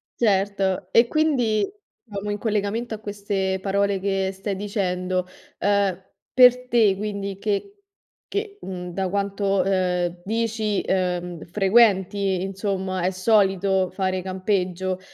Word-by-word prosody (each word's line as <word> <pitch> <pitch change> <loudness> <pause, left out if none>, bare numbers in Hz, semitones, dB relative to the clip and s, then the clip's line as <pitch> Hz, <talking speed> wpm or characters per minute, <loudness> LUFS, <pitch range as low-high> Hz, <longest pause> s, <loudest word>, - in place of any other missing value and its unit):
Certo. 195 -3 +1
E 230 +3 +5
quindi, 250 -8 +2 0.4
diciamo, 210 -3 -6
in 205 - -2
collegamento 215 +2 -1
a 215 - -5
queste 200 -2 -2
parole 200 0 +1
che 195 0 0
stai 195 +1 -4
dicendo, 185 -2 -1 0.3
ehm, 200 -3 +2 0.3
per 250 0 +6
te, 220 -6 +4
quindi 200 -1 -4
che 210 - -2 0.6
che 405 0 -3
mhmm, 180 -1 -6
da 190 0 -1
quanto, 200 0 0
ehm, 180 -2 0
dici, 220 -1 -1
ehm, 180 -2 -1
frequenti, 195 -1 +3
insomma 190 -1 -2
è 180 - +2
solito 190 -1 +2
fare 185 0 -1
campeggio, 185 -1 -1
195 Hz, 120 wpm, -23 LUFS, 185-210 Hz, 0.6 s, per